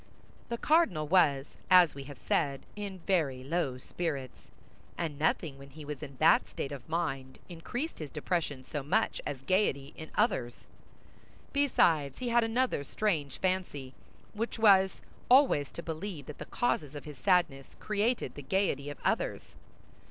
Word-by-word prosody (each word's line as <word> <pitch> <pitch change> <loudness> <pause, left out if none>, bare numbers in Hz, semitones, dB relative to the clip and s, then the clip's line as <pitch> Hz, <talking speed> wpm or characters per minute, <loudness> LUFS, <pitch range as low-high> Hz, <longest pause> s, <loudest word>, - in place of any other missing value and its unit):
The 235 - -2
cardinal 230 - +2
was, 145 -6 +4 0.2
as 180 -4 +7
we 140 -1 -8
have 140 -1 -10
said, 140 -4 0
in 200 -3 -6
very 145 -9 +1
low 140 -3 -1
spirits; 140 -2 -5 0.5
and 155 -4 -3
nothing 150 -2 0
when 140 0 -12
he 150 +2 -11
was 145 -1 -6
in 140 -3 -8
that 155 - +5
state 140 - -5
of 140 +1 -8
mind 135 -6 -2
increased 245 - -5
his 155 -3 -5
depression 150 -3 -2
so 145 +3 -4
much 140 - 0
as 135 -2 -5
gaiety 145 -5 +1
in 155 - -9
others. 130 - 0 0.9
Besides, 165 - +3
he 250 - -3
had 235 0 +4
another 225 - 0
strange 150 -5 -1
fancy, 180 -8 -2 0.4
which 225 +2 -3
was 195 -4 +5 0.3
always 250 - +5
to 170 - -7
believe 165 -2 -5
that 150 - -9
the - - -6
causes 155 - -1
of 145 - -7
his 150 -4 -9
sadness 170 -8 +1
created 215 +3 0
the 145 - -8
gaiety 145 -2 0
of 145 - -7
others. - - -1
155 Hz, 155 wpm, -31 LUFS, 140-195 Hz, 0.9 s, as